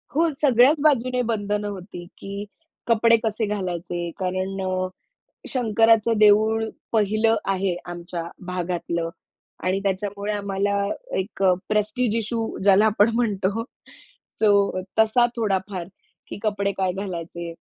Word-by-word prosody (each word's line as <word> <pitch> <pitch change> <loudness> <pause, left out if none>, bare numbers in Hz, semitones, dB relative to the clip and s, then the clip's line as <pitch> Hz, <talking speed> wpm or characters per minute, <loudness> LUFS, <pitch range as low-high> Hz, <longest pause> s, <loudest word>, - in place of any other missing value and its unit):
हो, 330 +1 +3
सगळ्याच 280 +2 +5
बाजूने 255 -4 +3
बंधनं 205 -1 -1
होती, 185 -3 -7
की 200 +1 -6 0.4
कपडे 230 0 +5
कसे 220 0 0
घालायचे, 175 -4 -3
कारण 185 +1 -2
अ, 185 0 -1 0.6
शंकराचं 225 -2 +3
देऊळ 215 +1 +5 0.3
पहिलं 220 +1 +2
आहे 190 -2 0
आमच्या 175 0 -5 0.2
भागातलं 175 -2 -2 0.5
आणि 185 +2 +1
त्याच्यामुळे 200 +1 -2
आम्हाला 200 0 -1 0.4
एक 195 +1 -4
अ, 185 - +6 0.2
प्रेस्टीज 215 +2 0
इश्यू, 225 0 -2
ज्याला 200 +2 +5
आपण 215 +1 +4
म्हणतो, 215 -2 0 0.8
सो, 200 -3 +3 0.2
तसा 220 +2 +5
थोडाफार, 195 -4 -1 0.4
की - - -7
कपडे 200 -2 0
काय 190 -1 +1
घालायचे. 170 -3 -5
205 Hz, 115 wpm, -23 LUFS, 185-225 Hz, 0.8 s, अ